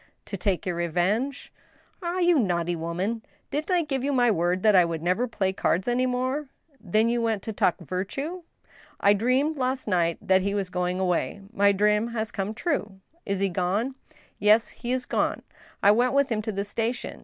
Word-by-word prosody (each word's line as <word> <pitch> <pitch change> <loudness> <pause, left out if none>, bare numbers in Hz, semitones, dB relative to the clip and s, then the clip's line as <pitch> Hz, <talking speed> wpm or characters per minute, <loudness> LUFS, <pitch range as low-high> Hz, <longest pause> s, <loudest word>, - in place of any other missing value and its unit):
* - - -43
" - - -48
To - - -2
take 190 -1 -1
your 180 - -1
revenge? 180 - -1
" - - -32
" - - -39
Ah! 350 0 -2
you 350 -4 +4
naughty 175 -5 0
woman! 180 +7 -2 0.3
Didn't 300 +5 -2
I 355 -2 +3
give 270 -4 -2
you 285 - 0
my 245 -3 +3
word 175 0 0
that 215 -2 +5
I 180 - +7
would 165 -1 -3
never 185 +8 +1
play 190 -5 -1
cards 185 +1 0
any 250 +1 +2
more? 255 +4 -1
" - - -46
" 280 -3 -32
Then 215 +2 +2
you 235 0 +1
went 225 -4 0
to 220 - -4
talk 180 - +2
virtue? 200 - -4 0.2
" - - -27
" - - -27
I - - +7
dreamed 255 +9 +1
last 260 0 -1
night 170 -4 +1
that 190 0 +3
he 200 +2 -1
was 195 -3 -2
going 180 0 -1
away. 185 +2 -1
My 200 -1 +4
dream 210 +2 +2
has 220 -1 -2
come 200 +2 -3
true." 215 - -2
" 335 +2 -37
Is 200 -1 -1
he 195 - +2
going? 190 +8 -1 0.2
" 310 -1 -27
" - - -41
Yes, 210 +3 +4
he 240 - -6
is 255 0 -1
gone. - - -1 0.4
I 200 - +7
went 245 +4 +2
with 280 0 +3
him 215 -1 0
to 220 +1 -3
the 200 -1 -2
station. 230 +4 -3
210 Hz, 235 wpm, -26 LUFS, 185-255 Hz, 0.4 s, I